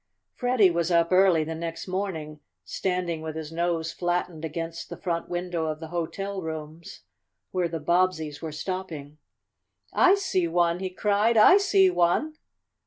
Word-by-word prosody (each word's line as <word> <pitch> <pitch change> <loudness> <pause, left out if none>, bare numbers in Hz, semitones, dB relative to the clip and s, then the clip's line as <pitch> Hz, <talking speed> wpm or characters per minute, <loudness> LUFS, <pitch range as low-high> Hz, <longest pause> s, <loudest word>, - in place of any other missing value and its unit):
Freddie 245 -7 +3
was 170 0 0
up 170 -1 +2
early 185 -3 +5
the 160 +1 -4
next 165 +2 -5
morning, 175 -6 -4 0.3
standing 180 -3 -2
with 160 -1 -6
his 160 -1 -6
nose 165 -1 -1
flattened 175 -2 -2
against 165 +1 -5
the 170 - -7
front 170 -2 -3
window 175 -2 -2
of 155 -1 -3
the 160 -1 -8
hotel 190 +4 -4
rooms 160 0 -7 0.5
where 180 -2 0
the 165 -1 -4
Bobbseys 160 -2 0
were 160 -1 -5
stopping. 155 -3 -6 0.7
"I 375 +2 +5
see 285 - 0
one!" 170 0 +1
he 190 0 -3
cried. 210 +4 +1
"I 220 - +8
see 390 -2 +4
one!" 300 - +1
170 Hz, 155 wpm, -26 LUFS, 160-185 Hz, 0.7 s, I